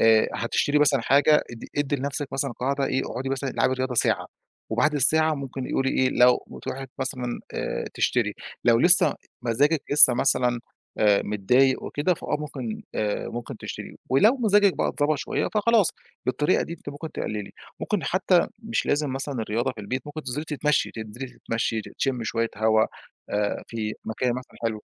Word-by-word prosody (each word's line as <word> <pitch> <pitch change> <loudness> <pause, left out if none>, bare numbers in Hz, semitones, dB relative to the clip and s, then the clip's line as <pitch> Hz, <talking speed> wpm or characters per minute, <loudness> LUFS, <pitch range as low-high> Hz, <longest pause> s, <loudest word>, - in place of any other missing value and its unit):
آآ، 110 -1 +5
هتشتري 145 +5 +1
مثلًا 145 -3 +3
حاجة، 145 +4 +4
ادّي 120 -1 -9
ادّي 145 0 0
لنَفسِك 140 +1 -3
مثلًا 135 -1 -1
قاعدة 135 +3 -1
إيه، 130 +1 0
اقعُدي 130 +2 -4
مثلًا 135 0 -2
العبي 130 - +1
رياضة 130 0 -2
ساعة - - +1 0.4
وبَعد 125 +7 +2
الساعة 155 +3 +3
ممكن 135 -2 -5
إيه - - -4
قولي 135 0 +1
إيه، 130 - +2
لو 125 -1 +4
بتروحي 135 +1 -6
مثلًا، 125 -2 -3
آآ، - - -3
تشتري - - +1 0.3
لو 115 -1 +5
لسّه 175 +3 +6 0.3
مزاجِك 140 +6 +2
لسّه 145 -4 +9
مثلًا، 125 -1 +1 0.4
آآ، 105 -2 +4
متضايق 125 +6 +2
وكده، 150 +5 0
فآه - - -3
ممكن، 130 -7 -5
آآ، 105 -1 -1
ممكن 120 0 -6
تشتري - - -8
ولو 215 - +5
مزاجِك 205 -5 +4
بقى - - +1
اتضبط 145 0 0
شوية - - -2
فخلاص، 215 -2 +3 0.4
بالطريقة 150 +6 +2
دي - - -6
أنتِ 170 - -9
ممكن 145 +3 -7
تقلّلي، 105 -2 -4 0.3
ممكن 210 -5 -1
حتّى 185 -1 +2 0.2
مش 225 +1 -2
لازم 145 -2 0
مثلًا 135 +1 -4
الرياضة 115 +4 -1
في 115 - -10
البيت، 125 +5 -4
ممكن 155 +1 -7
تنزِلي 135 +3 -4
تتمشّي، 150 -1 0
تنزِلي 110 +4 -7
تتمشّي، 115 -2 -2
ت - - -11
تشمّي 125 -4 -1
شوية 115 0 -1
هوا، 110 0 +3 0.4
آآ، 105 0 -1
في 110 -2 -3
مكان 120 +3 -1
مثلًا 130 0 -8
حلو. 110 -2 -2
135 Hz, 175 wpm, -25 LUFS, 115-150 Hz, 0.4 s, لسّه